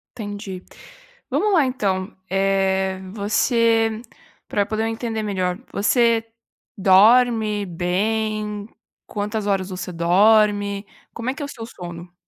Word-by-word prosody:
Entendi. 205 -4 -6 0.7
Vamos 420 -1 +1
lá 320 -6 +4
então, 200 -6 -2
eh, 190 0 +1
você 225 +1 +2 0.5
para 205 - 0
eu 200 - 0
poder 220 0 -1
entender 225 -1 -3
melhor, 185 -3 -1 0.2
você 230 +2 +2 0.5
dorme 210 +2 +4
bem? 210 +4 -2 0.4
Quantas 210 0 -3
horas 195 -2 0
você 185 -1 -5
dorme? 205 +3 +3 0.3
Como 230 +2 -3
é - - -5
que 275 - -9
é - - -2
o 280 - -8
seu 230 -4 -8
sono? 175 -4 -9
205 Hz, 120 wpm, -22 LUFS, 190-225 Hz, 0.7 s, lá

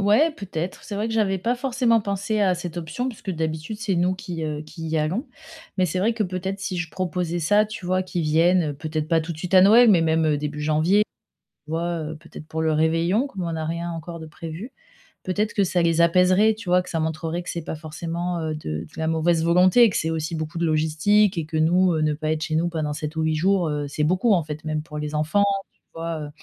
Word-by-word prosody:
ouais 215 +12 +4
peut-être, 185 - -6
c'est 205 - -6
vrai 215 +2 -1
que 225 - -3
j'avais 195 -3 +1
pas 230 +7 0
forcément 245 -2 +1
pensé 200 +2 -1
à 185 -2 +3
cette 175 -1 -6
option 170 +10 -3
parce 235 - -9
que 195 - -4
d'habitude 160 +4 -3
c'est 215 -4 -1
nous 180 +2 +2
qui, 175 -3 -6
heu, 150 -1 -3
qui 160 +1 -8
y 160 0 0
allons. 180 - -1 0.5
Mais 185 - +3
c'est 180 +3 -2
vrai 220 +5 +2
que 225 -1 -1
peut-être 190 +1 -3
si 190 -1 -3
je 170 -2 -3
proposais 180 -2 -2
ça 205 +6 +3
tu 210 -4 -8
vois, 185 +1 +1
qu'ils 180 -1 -3
viennent, 170 +4 +3
heu, - - -10
peut-être 155 +1 -4
pas 165 -1 +3
tout 170 - -5
de 155 - -11
suite 180 +3 -3
à 185 - +8
Noël, 225 +3 +7
mais 170 -4 +5
même, 160 0 +2
heu, 150 -1 +2
début 150 0 -4
janvier, 160 +7 +3 0.6
tu 150 - -13
vois, 170 +1 -1
heu, 155 +1 -5
peut-être 155 -1 -12
pour 160 0 -4
le 160 -1 +2
réveillon 165 - +2
comme 195 -9 -6
on 165 -1 -3
a 160 - -3
rien 170 +2 -3
encore 165 0 -7
de 160 - -8
prévu. 165 - -8 0.5
Peut-être 210 +3 -1
que 200 - +2
ça 175 0 +1
les 165 0 +2
apaiserait 185 +5 +4
tu 215 -4 -8
vois? 180 0 +4
Que 180 - -11
ça 165 - -2
montrerait 160 +2 -2
que - - -8
c'est 170 - -3
pas - - -4
forcément, 170 +3 -4
heu, 155 -1 -2
de 75 - -4
de 85 - -9
la 160 - -1
mauvaise 160 0 +2
volonté 180 +7 +5
et 230 - +6
que - - -2
c'est 160 - -1
aussi 160 +1 -2
beaucoup 155 +1 -5
de 170 - 0
logistique, 160 +6 +2
et 160 - -1
que 160 +1 -4
nous, 175 +3 +3
heu, 160 - 0
ne 155 -1 +2
pas 155 +1 -2
être 155 0 -1
chez 155 - -2
nous 170 +2 +1
pendant 155 -3 -2
7 150 +1 -5
ou 160 0 +1
jours, 185 +1 +2
heu, 145 -1 -2
c'est 150 +1 -2
beaucoup 185 +6 +3
en 170 -4 +2
fait, 150 0 -7
même 155 -1 -2
pour 150 -1 -9
les 150 0 -4
enfants 155 +7 +2 0.5
tu - - -13
vois? 165 -1 -3
Heu, 145 - -6
170 Hz, 260 wpm, -23 LUFS, 155-190 Hz, 0.6 s, à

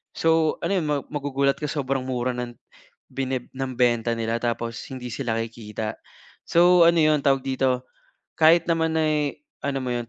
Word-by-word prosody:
So 160 -1 +2
ano 170 - 0
yun, 155 - -3
ma 145 -1 0
magugulat 140 -1 0
ka, 150 - -3
sobrang 135 -3 -2
mura 125 -1 -1
ng 120 -1 -5 0.5
bine 130 -2 -3
ng 135 0 -3
benta 120 -1 +2
nila 115 0 -1
tapos 115 -1 -2 0.2
hindi 125 -2 -6
sila 120 -4 -2
kikita. 110 -1 -5 0.5
So, 175 +1 +6
ano 170 0 +4
'yon, 155 -1 +3
tawag 135 -1 +2
dito, 130 -1 0 0.5
kahit 165 +1 +6
naman 160 -1 +1
ay 150 -2 0 0.2
ano 135 -1 -2
mo 125 - -2
'yon, 120 -1 -3
135 Hz, 165 wpm, -24 LUFS, 120-155 Hz, 0.5 s, So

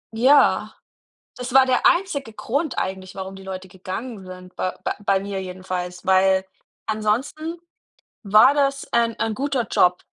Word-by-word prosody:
Ja. 265 +6 +4 0.6
Das 250 0 -6
war 265 -1 +7
der 255 -1 +2
einzige 305 - +1
Grund 280 +7 -2
eigentlich, 190 0 -4
warum 190 0 -6
die 195 - -11
Leute 190 -1 -7
gegangen 190 +4 -7
sind, 185 0 -11
bei 185 - -1
bei - - -1
bei 195 -1 +3
mir 195 -1 -4
jedenfalls. 180 -1 -6
Weil, 190 0 +4 0.4
ansonsten 245 +10 -2 0.6
war 215 +6 +6
das, 275 -1 0
ähm, 230 -1 +2
ein 225 -1 -1
guter 270 -1 -1
Job. 180 0 +3
215 Hz, 150 wpm, -22 LUFS, 190-260 Hz, 0.6 s, war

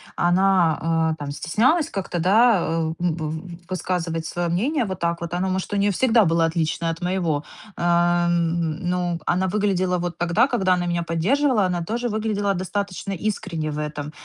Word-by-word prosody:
она, 170 -3 +2
э, - - -5
там 145 -1 -5
стеснялась 255 - +1
как-то, 190 -3 -3
да, 215 +5 +5
э, 160 0 -1
м, 175 -2 0
в 155 -1 -4 0.3
высказывать 170 -2 -2
свое 175 +1 -2
мнение 245 - 0
вот 190 -2 -5
так 170 0 -1
вот. 170 0 -5
Оно, 185 +2 0
может, 185 0 -2
у - - +1
нее 200 0 +2
всегда 230 +1 +3
было 165 0 +2
отлично 165 0 -1
от 165 +2 -4
моего. 175 -5 -1 0.3
А, 175 0 +2
м, 170 -2 0
ну, 175 -1 -1
она 185 +1 +1
выглядела 185 -2 +1
вот 175 -1 -4
тогда, 175 +9 +2
когда 190 -8 +2
она 175 -1 0
меня 175 0 -1
поддерживала, 210 - +2
она 175 -2 -1
тоже 235 +6 -2
выглядела 210 -2 -1
достаточно 195 +1 -3
искренне 185 -5 -3
в 150 - -5
этом. 150 -1 -4
175 Hz, 175 wpm, -23 LUFS, 165-200 Hz, 0.3 s, да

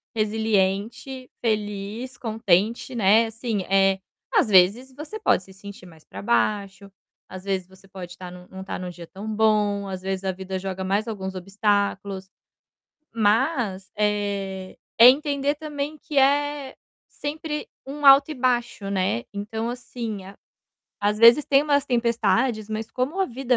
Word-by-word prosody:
resiliente, 220 +4 -1
feliz, 210 +2 -3
contente, 220 +2 0
né, 220 +1 +5
assim, 225 -2 -3
eh, 195 0 +3 0.3
às - - +4
vezes 210 +7 +4
você 305 +10 -7
pode 190 - +2
se 190 - -16
sentir 200 -1 -11
mais 160 -3 -16
para 100 +1 -9
baixo, 195 - 0 0.4
às 185 0 -9
vezes 190 -2 -2
você 190 +1 -19
pode 180 -2 -9
estar 180 0 -9
num 180 0 -12
não 190 0 -9
estar 190 - -5
em 185 - -5
um - - -4
dia 175 -1 -10
tão 200 +5 -9
bom, 210 -2 +2
às 190 -1 -5
vezes, 190 0 -3
a 190 - 0
vida 190 0 -5
joga 190 0 -4
mais 200 +4 0
alguns 190 -3 -5
obstáculos. 200 0 -1 0.9
Mas, 220 - +1
eh, 200 -2 -2 0.2
é 235 - +11
entender 285 +1 +1
também 295 -1 -5
que 295 0 -6
é 285 0 +2 0.3
sempre 300 0 -5 0.2
um 290 +2 -7
alto 275 +2 +8
e - - -3
baixo, 240 -5 -1
né. 185 - -1
Então, 220 +3 -4
assim, 240 -3 -5 0.8
às 205 +1 +1
vezes 235 +6 +7
tem 275 0 +4
umas 285 -2 +2
tempestades, 235 -1 +1
mas 220 +1 -4
como 265 +11 -2
a - - +4
vida 250 0 0
210 Hz, 155 wpm, -24 LUFS, 195-255 Hz, 0.9 s, é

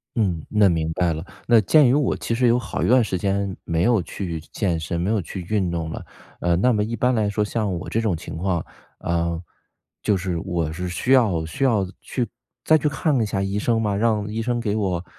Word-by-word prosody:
嗯， 90 -8 0
那 105 -2 +4
明 80 -2 0
白 90 -2 +1
了。 80 +2 -5 0.2
那 115 -2 +6
鉴 145 - +5
于 125 - +4
我 145 -2 +2
其 115 - -3
实 125 +1 +3
有 120 - +4
好 125 - -4
一 - - +1
段 125 -1 +5
时 95 - -2
间 100 0 -1
没 85 +1 0
有 115 -3 +3
去 85 -1 -5
健 90 -6 0
身、 85 +2 -3
没 90 +4 -1
有 110 -3 +1
去 90 +3 -6
运 100 -4 +1
动 80 -2 -3
了， - - -6 0.4
呃， 85 -1 +2
那 125 +7 +3
么 105 -1 +1
一 115 +2 -3
般 125 +3 +2
来 110 -3 +1
说 105 +1 0
像 105 -1 -1
我 85 - -7
这 115 - 0
种 105 -6 +1
情 80 - -8
况 90 -1 -1 0.3
呃， 85 -1 -1 0.6
就 100 -2 +2
是 90 -2 -2
我 85 -4 -2
是 90 +2 -4
需 90 +9 -2
要 105 -11 +4
需 135 - -3
要 110 -7 +3 0.2
去 120 -3 -2 0.4
再 155 - +5
去 150 - 0
看 145 +1 0
一 - - +2
下 95 -2 -2
医 100 +1 -1
生 115 +1 +1
吗？ 105 -2 0
让 105 -1 +1
医 110 +2 -3
生 120 +1 -1
给 105 -3 -1
我 95 -5 -1
100 Hz, 255 characters per minute, -23 LUFS, 85-115 Hz, 0.6 s, 那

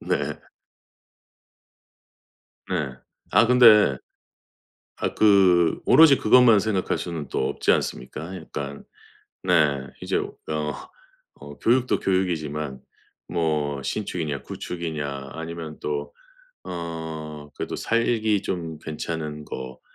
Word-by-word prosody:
네. - - -1 2.3
네. 75 -8 -2 0.4
아, 115 - +6
근데 110 - +7 1.0
아 - - -2
그 95 -5 +4
오로지 155 -4 +7
그것만 115 -2 +6
생각할 100 -4 0
수는 85 -5 -5
또 65 - -1
없지 - - +1
않습니까? 80 +9 -4
약간 70 -4 -7 0.6
네, 75 -7 +2 0.2
이제 - - -1
어 - - -3 1.1
어 - - -10
교육도 125 +2 +2
교육이지만 75 -7 -1 0.5
뭐 75 -4 -1
신축이냐 80 -7 -3
구축이냐 75 -5 -5
아니면 80 -1 -7
또 75 -1 -3 0.5
어 80 -3 -6
그래도 - - -4
살기 110 -3 +1
좀 80 -4 -4
괜찮은 75 -1 -5
거, 65 -2 -7
80 Hz, 195 characters per minute, -24 LUFS, 75-95 Hz, 2.3 s, 근데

